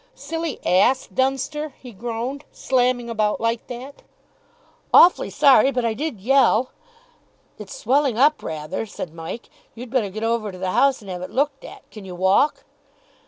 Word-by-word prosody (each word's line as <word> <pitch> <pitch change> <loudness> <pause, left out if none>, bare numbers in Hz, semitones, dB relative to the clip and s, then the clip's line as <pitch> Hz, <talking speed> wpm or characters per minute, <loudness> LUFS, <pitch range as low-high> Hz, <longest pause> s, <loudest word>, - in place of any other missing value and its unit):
"Silly 325 +1 -5
ass, 245 +9 +3
Dunster," 270 +3 -2
he 250 - -11
groaned, 240 +6 -5
"slamming 250 -2 0
about 215 -2 -1
like 230 0 -2
that." 255 +3 -9 0.9
"Awfully 355 - +6
sorry. 270 -2 +5
But 250 -3 -1
I 230 - 0
did 270 -2 -4
yell." 255 +1 +3 0.9
"It's - - -9
swelling 280 - +1
up 295 +4 +3
rather," 160 +7 -5
said 175 -5 -7
Mike. 165 +8 -8 0.3
"You'd 240 0 -9
better 245 -6 0
get 215 +3 -6
over 225 -2 -1
to 185 - -11
the 185 0 -3
house 275 +2 +2
and 195 - -8
have 180 -1 -6
it 185 - -6
looked 275 0 -1
at. - - -12
Can 215 - -11
you 185 -2 -8
walk?" 190 +11 +2
245 Hz, 165 wpm, -22 LUFS, 210-275 Hz, 0.9 s, Awfully